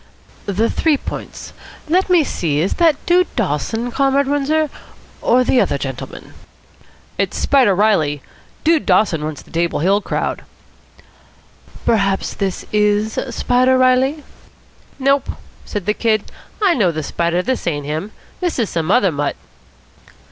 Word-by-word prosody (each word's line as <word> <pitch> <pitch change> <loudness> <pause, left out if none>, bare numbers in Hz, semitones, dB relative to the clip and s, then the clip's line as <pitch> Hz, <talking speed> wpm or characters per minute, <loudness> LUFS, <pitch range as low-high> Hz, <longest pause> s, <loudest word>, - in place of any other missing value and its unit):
"The 205 +3 +1
Three 310 +3 +1
Points? - - -8 0.3
Let 365 +4 +2
me 355 -3 +5
see, 155 - -1
is 175 +5 +1
that 325 -3 +5
Dude 360 +1 +3
Dawson, 225 - -1
Comrade 275 +1 +2
Windsor, 290 +2 +1 0.5
or 250 +1 +3
the 250 0 +3
other 190 - 0
gentleman?" 135 -2 -7 0.9
"It's - - -1
Spider 255 -9 +3
Reilly. 160 -9 +2 0.4
Dude 320 -1 +2
Dawson 180 -5 +2
runs 155 -1 -5
the - - -20
Table 170 +1 0
Hill 195 +6 +2
crowd." - - -3 1.4
"Perhaps 195 -3 +1
this 195 -2 -3
is 210 +1 +1
Spider 250 +2 +2
Reilly?" 260 +4 +2 0.7
"Nope," 275 +1 +1 0.4
said 205 -4 -5
the 210 - +1
Kid. 215 -2 0 0.3
"I 380 -4 +5
know 205 - +2
the 155 -1 -4
Spider. 170 +4 -1
This 260 -4 -2
ain't 145 -4 -1
him. 155 +8 -4 0.3
This 355 -2 -1
is 230 -5 -1
some 165 0 -2
other 200 -3 +4
mutt." 145 -1 -2
215 Hz, 140 wpm, -18 LUFS, 175-270 Hz, 1.4 s, me